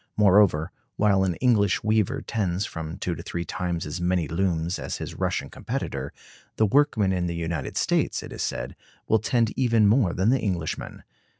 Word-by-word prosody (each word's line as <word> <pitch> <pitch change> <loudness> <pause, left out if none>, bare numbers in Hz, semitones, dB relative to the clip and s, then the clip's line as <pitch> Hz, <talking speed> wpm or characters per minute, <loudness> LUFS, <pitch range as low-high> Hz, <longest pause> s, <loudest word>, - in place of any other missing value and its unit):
Moreover, 95 -5 +4 0.2
while 100 -2 +3
an 90 -3 0
English 105 -5 +2
weaver 110 +5 +1
tends 95 -3 -1
from 80 +1 -6
two 90 - -2
to 85 - -7
three 85 0 -4
times 85 -2 -3
as 85 +4 -5
many 90 -2 +1
looms 85 +1 -1
as - - -4
his - - -6
Russian - - -2
competitor, 70 +1 -4 0.4
the 110 - +3
workman 110 -5 +3
in 90 -1 -1
the 85 - -3
United 80 -4 -3
States, - - +1
it - - -9
is - - -6
said, - - -3 0.3
will 110 - +3
tend 115 +1 +1
even 115 -4 +3
more 105 -4 +3
than 95 +4 +1
the 135 - +3
Englishman. 90 -7 -3
95 Hz, 180 wpm, -25 LUFS, 85-110 Hz, 0.4 s, Moreover